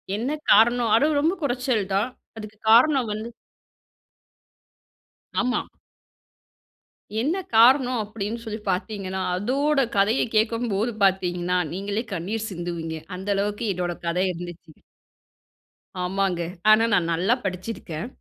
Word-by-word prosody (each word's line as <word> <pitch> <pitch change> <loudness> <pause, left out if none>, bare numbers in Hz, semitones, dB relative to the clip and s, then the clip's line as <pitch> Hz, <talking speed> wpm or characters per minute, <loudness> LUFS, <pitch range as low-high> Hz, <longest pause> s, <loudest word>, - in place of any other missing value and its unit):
என்ன 235 +7 -2 0.2
காரணம் 235 +1 +5
அதுவும் 295 +5 +3
ரொம்ப 320 +5 +2
குறைச்சல் 250 -5 0
தான். 200 +5 +1 0.3
அதுக்கு 215 0 -9
காரணம் 255 +2 +5
வந்து. 215 +2 -5 2.1
ஆமா. 250 0 0 1.6
என்ன 320 +9 0 0.2
காரணம் 250 +2 +5
அப்படீன்னு 210 +2 -5
சொல்லி 220 0 -5
பாத்தீங்கன்னா, 190 0 -3 0.2
அதோட 275 +9 +1 0.2
கதைய 205 +5 +3
கேக்கும்போது 225 0 +1
பாத்தீங்கன்னா, 180 -2 +1 0.2
நீங்களே 200 +4 -3
கண்ணீர் 210 +5 -3
சிந்துவீங்க. 170 -3 -5 0.2
அந்த 190 +2 -6
அளவுக்கு 205 +3 -2
என்னோட 175 -1 -2
கதை 175 +2 +1
இருந்துச்சு. 175 -1 -9 1.3
ஆமாங்க. 185 -1 0 0.3
ஆனா, 215 +1 +7
நான் 170 -4 +2
நல்லா 185 +8 +2
படிச்சிருக்கேன். 185 -2 -5
210 Hz, 105 wpm, -24 LUFS, 185-235 Hz, 2.1 s, ஆனா